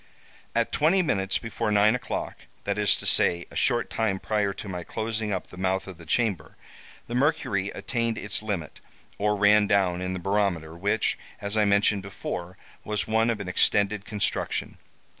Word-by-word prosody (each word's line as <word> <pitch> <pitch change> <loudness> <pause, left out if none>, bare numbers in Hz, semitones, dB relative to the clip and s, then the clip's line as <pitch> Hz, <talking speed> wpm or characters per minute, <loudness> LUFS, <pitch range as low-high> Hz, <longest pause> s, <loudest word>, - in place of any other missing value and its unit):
"At - - +1
twenty 175 +5 +3
minutes 95 - 0
before 115 -2 -3
nine 105 +1 +5
o'clock—that 125 - -4
is - - +4
to - - -6
say, 85 0 +4
a - - -12
short 120 -2 +1
time 110 -4 0
prior 105 -1 0
to 100 - -8
my 90 -2 -5
closing 110 +1 -3
up 95 - -3
the 90 - -12
mouth 95 0 0
of 95 -3 -10
the 85 - -13
chamber, 110 0 0 0.5
the 120 - -7
mercury 125 -8 +1
attained 115 -2 -1
its 105 0 -1
limit, 100 -8 -4 0.4
or 105 +1 +2
ran 105 0 +5
down, 95 -3 +2
in 90 0 -2
the 95 - -4
barometer, 90 -4 0
which, 100 +4 0 0.2
as 100 +1 -3
I 105 -1 +3
mentioned 100 0 +3
before, 90 -1 -6 0.3
was 105 -1 -2
one 110 +1 +2
of 115 -3 0
an 100 - -5
extended 100 +2 +2
construction. 105 -2 -2
100 Hz, 175 wpm, -26 LUFS, 95-110 Hz, 0.5 s, nine